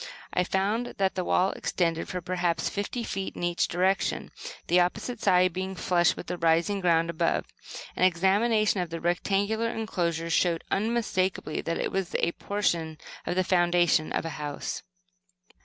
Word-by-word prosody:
I 180 Hz, -, +2 dB
found 205 Hz, +6 st, -1 dB
that 195 Hz, -1 st, +1 dB
the 185 Hz, -, -2 dB
wall 185 Hz, +2 st, +2 dB
extended 165 Hz, -2 st, -1 dB
for 180 Hz, -1 st, -3 dB
perhaps 175 Hz, -2 st, -1 dB
fifty 205 Hz, +4 st, -3 dB
feet 195 Hz, -3 st, -4 dB
in -, -, -6 dB
each 175 Hz, 0 st, +1 dB
direction, 190 Hz, +3 st, 0 dB, 0.3 s
the 180 Hz, -, +4 dB
opposite 215 Hz, +6 st, -1 dB
side 180 Hz, -1 st, +4 dB
being 190 Hz, +1 st, -3 dB
flush 175 Hz, -1 st, +2 dB
with -, -, -7 dB
the 180 Hz, 0 st, -4 dB
rising 170 Hz, +5 st, +2 dB
ground 165 Hz, -2 st, +2 dB
above. 160 Hz, -, 0 dB, 0.5 s
An -, -, 0 dB
examination 200 Hz, +3 st, +3 dB
of 175 Hz, -, -3 dB
the 165 Hz, 0 st, -5 dB
rectangular 200 Hz, +6 st, 0 dB
enclosure 170 Hz, -7 st, -2 dB
showed 170 Hz, 0 st, +2 dB
unmistakably 195 Hz, -6 st, 0 dB
that 165 Hz, -, -2 dB
it -, -, -2 dB
was 190 Hz, -2 st, -2 dB
a 170 Hz, -, +2 dB
portion 170 Hz, -6 st, -1 dB, 0.3 s
of -, -, 0 dB
the 185 Hz, -, +2 dB
foundation 175 Hz, -3 st, +3 dB
of -, -, -1 dB
a -, -, -2 dB
house. 145 Hz, -1 st, -4 dB
180 Hz, 160 wpm, -27 LUFS, 170-195 Hz, 0.5 s, the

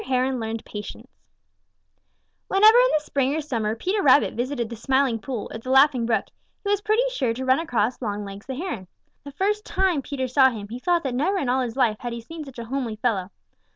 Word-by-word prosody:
HERON 260 Hz, 0 st, 0 dB
LEARNED 225 Hz, 0 st, -4 dB
PATIENCE 210 Hz, -1 st, -8 dB, 1.4 s
Whenever 430 Hz, +4 st, +6 dB
in -, -, +5 dB
the 300 Hz, -, -5 dB
spring 275 Hz, -1 st, 0 dB
or -, -, 0 dB
summer 230 Hz, -8 st, -2 dB
Peter 375 Hz, -, -1 dB
Rabbit 280 Hz, -2 st, +5 dB
visited 245 Hz, -1 st, -2 dB
the 235 Hz, -, -7 dB
Smiling 260 Hz, 0 st, +1 dB
Pool 245 Hz, -3 st, -5 dB
or 225 Hz, -, -5 dB
the 255 Hz, -, -8 dB
Laughing 265 Hz, -3 st, +4 dB
Brook, 220 Hz, -4 st, +1 dB, 0.4 s
he 400 Hz, -, -1 dB
was 410 Hz, 0 st, +1 dB
pretty 430 Hz, +4 st, +2 dB
sure 255 Hz, -, -1 dB
to 260 Hz, +2 st, -4 dB
run 260 Hz, +2 st, +4 dB
across 245 Hz, -7 st, -1 dB
Longlegs 205 Hz, -1 st, -5 dB
the 265 Hz, -, -4 dB
Heron. 260 Hz, -, -5 dB, 0.4 s
The 285 Hz, -, -9 dB
first 415 Hz, +8 st, -1 dB
tune 370 Hz, -8 st, +1 dB
Peter 265 Hz, -1 st, -3 dB
saw 265 Hz, +1 st, +5 dB
him, 210 Hz, -4 st, -7 dB
he 240 Hz, +3 st, -6 dB
thought 345 Hz, +4 st, +1 dB
that 265 Hz, -3 st, -2 dB
never 325 Hz, +11 st, +1 dB
in 275 Hz, -8 st, -1 dB
all 260 Hz, +1 st, +2 dB
his 240 Hz, -2 st, -3 dB
life 230 Hz, -5 st, +2 dB
had 240 Hz, -1 st, -5 dB
he 235 Hz, -, -6 dB
seen 320 Hz, +7 st, -8 dB
such 270 Hz, -3 st, -12 dB
a 235 Hz, -, -6 dB
homely 245 Hz, -2 st, -3 dB
fellow. 210 Hz, -5 st, -1 dB
260 Hz, 220 wpm, -24 LUFS, 230-300 Hz, 1.4 s, Whenever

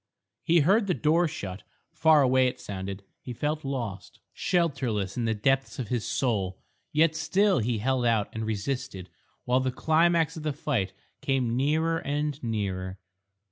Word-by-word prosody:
He 170 Hz, 0 st, +4 dB
heard 200 Hz, +7 st, +3 dB
the 180 Hz, -, +1 dB
door 165 Hz, +3 st, +3 dB
shut. 100 Hz, -, -6 dB, 0.3 s
Far 160 Hz, -2 st, +5 dB
away 130 Hz, 0 st, +4 dB
it 125 Hz, -, -4 dB
sounded. 95 Hz, 0 st, -6 dB, 0.2 s
He 125 Hz, -, -7 dB
felt 150 Hz, +5 st, -2 dB
lost, 120 Hz, -8 st, -5 dB
shelterless 130 Hz, -, 0 dB
in 120 Hz, -, -1 dB
the 110 Hz, -1 st, +1 dB
depths 135 Hz, +5 st, +1 dB
of 120 Hz, -5 st, -4 dB
his 120 Hz, -3 st, -1 dB
soul. 100 Hz, -8 st, 0 dB, 0.3 s
Yet 160 Hz, +1 st, +3 dB
still 190 Hz, +4 st, +2 dB
he 115 Hz, 0 st, 0 dB
held 125 Hz, +2 st, +1 dB
out 110 Hz, -3 st, +2 dB
and 110 Hz, -, -3 dB
resisted 110 Hz, -3 st, -3 dB, 0.3 s
while 125 Hz, +1 st, +3 dB
the 130 Hz, 0 st, 0 dB
climax 160 Hz, +3 st, +2 dB
of 160 Hz, -, -6 dB
the 150 Hz, -1 st, -1 dB
fight 120 Hz, -10 st, -1 dB, 0.3 s
came 135 Hz, -4 st, 0 dB
nearer 160 Hz, +5 st, +1 dB
and 145 Hz, 0 st, -2 dB
nearer.... 95 Hz, -5 st, -3 dB
130 Hz, 160 wpm, -27 LUFS, 110-155 Hz, 0.3 s, Far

